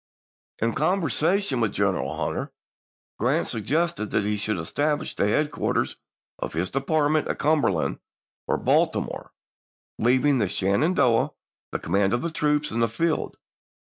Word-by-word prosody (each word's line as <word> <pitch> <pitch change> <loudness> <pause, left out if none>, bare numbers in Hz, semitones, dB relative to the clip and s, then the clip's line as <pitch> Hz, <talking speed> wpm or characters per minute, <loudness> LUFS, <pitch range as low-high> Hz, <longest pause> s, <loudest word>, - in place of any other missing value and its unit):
In 115 +1 0
conversation 170 -1 +1
with 110 -3 +1
General 100 -2 0
Hunter, - - -3 0.7
Grant - - +1
sug 110 -2 -3
gested 165 -7 0
that 105 - +1
he 105 +1 0
should 105 0 -1
establish 145 - -1
the 100 - +1
headquarters 150 +7 0 0.4
of - - -4
his 85 +4 -2
department 150 +2 +1
at - - -2
Cumberland 145 - +1 0.5
or - - +1
Baltimore, - - 0 0.7
leav 125 +4 +3
ing 145 -3 +4
to 100 -4 +1
Sheridan 100 - +1
the 120 -5 0
command 95 +4 +1
of 120 - 0
the 170 - -2
troops 150 -1 +1
in 115 - -2
the 115 -1 +2
field. 160 +8 -1
130 Hz, 140 wpm, -25 LUFS, 105-155 Hz, 0.7 s, ing